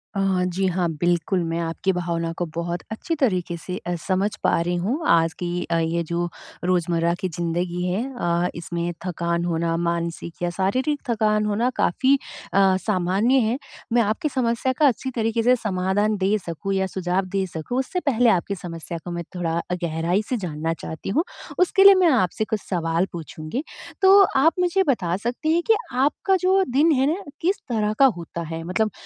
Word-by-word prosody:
अ, - - -1 0.3
जी 185 +2 -1
हाँ, 180 -1 0
बिल्कुल 175 +1 +1
मैं 165 +1 -1
आपकी 165 +3 -1
भावना 170 -2 -2
को 175 - -1
बहुत 170 +1 -2
अच्छी 325 +9 -3
तरीक़े 185 - 0
से 180 +2 -6
अ, 175 - 0
समझ 190 +2 +2
पा - - +3
रही 175 +1 -1
हूँ 225 - -1
आज 165 -1 +4
की 175 0 -2
अ, 170 - +3
ये 165 +1 0
जो 170 +2 -2 0.4
रोज़मर्रा 170 -1 +1
की 185 -2 -2
ज़िंदगी 175 +1 -2
है 185 +5 0 0.2
अ, 175 +1 +1
इसमें 170 0 -3
थकान 170 -1 -1
होना 165 -1 0
मानसिक 170 0 -3
या 175 - +1
शारीरिक 260 +10 0
थकान 215 -2 +2
होना 215 +4 +1
काफ़ी 265 +10 +3 0.4
अ, 195 -1 +5
सामान्य 195 +6 +2
है। 235 +4 0 0.4
मैं 240 - +5
आपकी 220 +8 0
समस्या 255 0 0
का 295 - +6
अच्छी 260 +1 0
तरीके 225 0 0
से 250 +1 +5
समाधान 205 -1 0
दे 200 +2 +2
सकूँ 175 +4 -3
या 190 0 +1
सुझाव 185 +1 -1
दे 190 -1 +1
सकूँ, 170 +8 -4
उससे 360 +8 -2
पहले 245 -7 +3
आपकी 195 0 +1
समस्या 170 -2 -6
को 175 - -5
मैं 170 0 -3
थोड़ा 170 -2 -1
अ, - - +1
गहराई 170 +4 0
से 250 - 0
जानना 165 -3 -3
चाहती 160 - -6
हूँ, 305 - +2 0.4
उसके 370 +2 +4
लिए 395 0 +10
मैं 345 - +5
आपसे 215 -3 +1
कुछ 215 -2 -1
सवाल 165 -1 +1
पूछूँगी। 160 - -5 0.4
तो 385 +1 +8 0.2
आप 315 +5 +5
मुझे 360 +2 +2
बता 180 -10 +1
सकती 245 +9 -1
हैं 340 - +3
कि 450 - +6 0.3
आपका 380 +7 +2
जो 380 +1 +4
दिन 310 +5 +4
है 265 -3 +3
ना 395 - -6 0.2
किस 380 +4 0
तरह 215 -2 0
का 275 - +8
होता 170 0 -6
है? 165 0 -5
मतलब 215 +5 0
185 Hz, 190 wpm, -23 LUFS, 170-235 Hz, 0.4 s, लिए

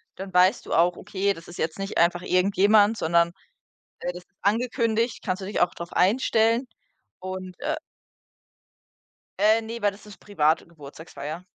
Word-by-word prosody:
dann 190 0 -7
weißt 180 +2 +4
du - - -4
auch, 175 +1 +3
okay, 200 +1 -1
das 165 -3 -13
ist 175 - -11
jetzt 160 +3 -3
nicht 195 0 -4
einfach 175 +1 +3
irgendjemand, 205 +4 +3
sondern, 170 -1 +2 0.7
äh, 180 - -3
das 175 0 -10
ist - - -47
angekündigt. 230 +2 0
Kannst 185 -2 -2
du - - -5
dich 205 - -2
auch 175 0 +2
drauf 170 0 -8
einstellen. 230 +4 +2 0.5
Und, 185 0 -7
äh 305 +3 -1 1.6
Äh, 215 +3 +4
ne, 230 +1 -6
weil 205 - +3
das 200 +2 -16
ist 210 - -13
private 160 -6 0
Geburtstagsfeier. 160 +1 -9
190 Hz, 160 wpm, -25 LUFS, 175-215 Hz, 1.6 s, weißt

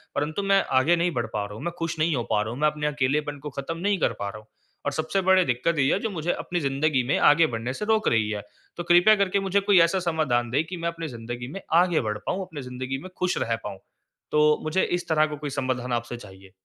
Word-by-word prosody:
परंतु 155 +7 -1
मैं 195 0 +3
आगे 150 +7 +4
नहीं 175 +1 +1
बढ़ 120 -3 -1
पा 105 - -1
रहा 105 - -9
हूँ, 110 - -8
मैं 175 - -3
खुश 165 -1 -2
नहीं 155 0 +2
हो 120 - -1
पा 105 -1 +3
रहा 110 +1 -3
हूँ, 125 - -8
मैं 150 - +4
अपने 150 0 -1
अकेलापन 145 +1 -1
को 150 +2 -6
खत्म 150 +4 -4
नहीं 200 +2 0
कर - - +1
पा 100 - -3
रहा 105 - -8
हूँ। 110 0 -15 0.4
और 145 - 0
सबसे 160 +6 -1
बड़ी 190 0 +4
दिक्कत 125 +7 0
ये 135 0 +3
है, - - +1
जो 225 - -2
मुझे 175 -3 -2
अपनी 175 - -3
ज़िंदगी 140 -1 +1
में 140 - +2
आगे 160 +2 +5
बढ़ने 120 0 -4
से 210 - -4
रोक 220 0 +2
रही 110 -2 +2
है। 105 -1 -3 0.4
तो 175 - -3
कृपया 175 +5 +6
करके 200 -1 +1
मुझे 195 0 +1
कोई 200 -1 +4
ऐसा 190 +3 -1
समाधान 155 -9 0
दें 140 +6 +1
कि 180 +2 -6
मैं 170 0 -3
अपनी 165 -1 -5
ज़िंदगी 120 -1 -6
में 195 - -6 0.2
आगे 175 -3 +2
बढ़ 105 -3 -2
पाऊँ, 195 - -1
अपनी 160 -6 -8
ज़िंदगी 130 +1 -5
में 185 - -8
ख़ुश 180 0 0
रह 115 - 0
पाऊँ। 100 -2 -6 0.5
तो 150 0 +4
मुझे 155 +5 +1
इस 175 0 -2
तरह 155 -1 +4
का 150 - -5
कोई 145 0 -5
समाधान 130 -2 -2
आपसे 120 0 -3
चाहिए। 95 -4 -14
150 Hz, 265 wpm, -25 LUFS, 125-175 Hz, 0.5 s, कृपया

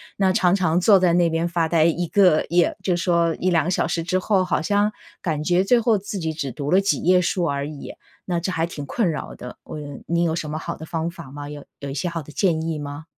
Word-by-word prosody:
那 190 -2 +2
常 180 0 +3
常 180 -3 +2
坐 200 +2 +6
在 180 -2 +3
那 170 -1 +3
边 165 +1 0
发 170 -1 0
呆 160 -1 +3
一 170 +2 +1
个 180 -4 +4
也 175 +1 +2
就 180 -2 +1
说 170 -1 +1
1、2 175 -2 +2
小 180 - +1
时 165 - -1
之 185 +3 0
后， 190 -1 +1
好 - - 0
像 205 +4 +2 0.3
感 155 -4 -2
觉 180 +3 +2
最 240 +3 +4
后 225 -2 +3
自 200 +1 -6
己 160 -3 -2
只 150 -3 -4
读 145 +3 -4
了 185 - +6
几 195 0 +1
页 180 +2 +4
书 180 0 0
而 140 -2 -1
已， 150 -2 -8 0.3
那 175 -2 -1
这 180 +2 -3
还 165 -1 0
挺 155 -4 -7
困 185 +1 0
扰 150 - -6
的， 125 - -9
嗯， 145 -2 -7
你 170 +1 +1
有 165 -2 +1
什 160 -2 -3
么 155 - -3
好 - - -5
的 160 - -8
方 165 +1 -3
法 170 -5 -11
吗？ 145 +1 -8
有 145 -1 -9
有 140 - -6
一 135 - -4
些 145 +5 -2
好 165 -2 -4
的 150 - -12
建 160 -1 +1
议 160 -1 -3
吗？ 145 +1 -6
170 Hz, 275 characters per minute, -22 LUFS, 155-185 Hz, 0.3 s, 坐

